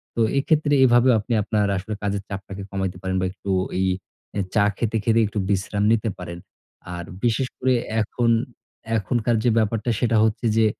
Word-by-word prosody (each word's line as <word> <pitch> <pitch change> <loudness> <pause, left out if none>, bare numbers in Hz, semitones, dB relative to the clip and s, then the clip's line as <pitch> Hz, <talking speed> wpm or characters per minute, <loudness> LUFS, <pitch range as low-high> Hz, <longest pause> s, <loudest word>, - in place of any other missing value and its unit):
তো 115 - +1 0.2
এক্ষেত্রে 150 +1 +2
এভাবেও 120 0 +5
আপনি 105 +3 -3
আপনার 105 -1 +1
আসলে 100 +3 -5
কাজের 100 -1 -1
চাপটাকে 100 0 -6
কমাইতে 95 -2 -2
পারেন 95 -1 -2
বা - - +1
একটু 100 0 -9 0.3
এই 95 - +2 0.5
আ - - +1 0.2
চা 100 - +5
খেতে, 115 -1 0
খেতে 115 +1 +3
একটু 105 +1 -3
বিশ্রাম 100 +1 0
নিতে 115 0 0
পারেন। 85 -1 -7 0.6
আর 85 - -5 0.2
বিশেষ 120 +2 +1
করে 130 0 +2 0.3
এখন 115 +3 0 0.7
এখনকার 115 +3 0
যে 120 - +4
ব্যাপারটা 110 +1 0
সেটা 115 -2 +2
হচ্ছে 110 +2 0
যে 110 - +5
110 Hz, 170 wpm, -23 LUFS, 100-120 Hz, 0.7 s, এভাবেও